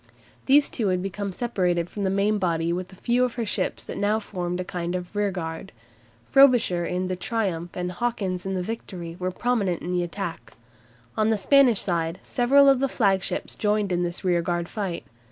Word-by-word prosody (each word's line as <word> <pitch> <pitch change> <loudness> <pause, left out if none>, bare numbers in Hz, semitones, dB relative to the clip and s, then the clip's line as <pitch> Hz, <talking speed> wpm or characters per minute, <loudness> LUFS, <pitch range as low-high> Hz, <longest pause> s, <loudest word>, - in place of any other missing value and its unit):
These 280 +2 +5
two 225 -5 -1
had 185 -1 0
become 195 +1 -3
separated 180 -6 0
from 205 - -7
the 195 - +1
main 200 +2 +1
body 170 -2 0
with 180 +2 -4
a - - -13
few 240 +6 +1
of 250 -2 -1
her 235 -2 -2
ships 205 - -2
that - - -6
now 205 +2 +2
formed 180 -4 -4
a - - -1
kind 175 -1 -4
of 180 +2 -6
rearguard. 190 -3 -3 0.6
Frobisher 245 -10 +5
in 180 +1 -2
the 185 - -2
"Triumph" 180 -4 -2
and 180 0 -2
Hawkins 190 -3 -2
in 190 0 -3
the 180 - -1
"Victory" 180 -5 -6
were 185 0 -1
prominent 200 -3 -1
in 175 - -3
the 180 0 +1
attack. 175 0 -5 0.6
On 215 0 +2
the 220 - +2
Spanish 245 +1 +4
side 170 -1 -1
several 275 +3 +4
of 270 -2 +5
the 275 0 +1
flagships 195 -6 0
joined 210 -2 0
in 175 0 +1
this 175 0 -3
rearguard 175 -1 0
fight. 195 -5 -4
190 Hz, 190 wpm, -25 LUFS, 175-220 Hz, 0.6 s, These